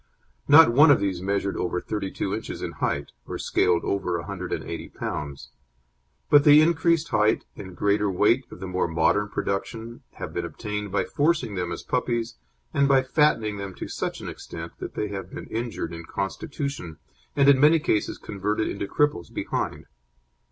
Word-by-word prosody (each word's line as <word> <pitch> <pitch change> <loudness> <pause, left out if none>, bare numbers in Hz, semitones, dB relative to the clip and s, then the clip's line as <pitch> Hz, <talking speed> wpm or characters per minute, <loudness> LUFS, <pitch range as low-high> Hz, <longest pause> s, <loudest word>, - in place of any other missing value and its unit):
Not 150 -4 +8
one 145 +5 +7
of 145 - +6
these 95 -3 -1
measured 100 0 -1
over 90 0 -1
32 100 -1 -3
inches 110 - -5
in - - -3
height, - - -2 0.2
or - - -4
scaled 90 -1 +1
over 95 -3 -1
180 90 +1 -5
lbs., 70 -2 -5 0.8
but 145 -1 +6
the 150 0 +8
increased 165 0 +3
height 110 +1 +2
and 95 -3 -10
greater 100 0 +2
weight 105 +7 +3
of - - -11
the 95 - -6
more 90 -1 -1
modern 80 +5 +1
production 115 +4 -4
have - - -7
been - - -2
obtained 105 -1 -5
by 100 - +1
forcing 145 -7 0
them 90 -2 -3
as - - -5
puppies 120 -2 -1 0.4
and 140 -1 +3
by 135 -1 +4
fattening 130 -7 +2
them 100 -2 -6
to - - -6
such - - -4
an - - -7
extent - - -7
that - - -7
they 105 - -2
have 95 -2 -6
been - - -7
injured 115 -7 -4
in 85 0 -7
constitution, 130 - -4 0.4
and 140 -1 +4
in 140 -2 +7
many 150 +4 +6
cases 150 -10 0
converted 105 +2 -2
into 100 0 -3
cripples 145 -12 0
behind. - - -3
105 Hz, 170 wpm, -25 LUFS, 95-140 Hz, 0.8 s, Not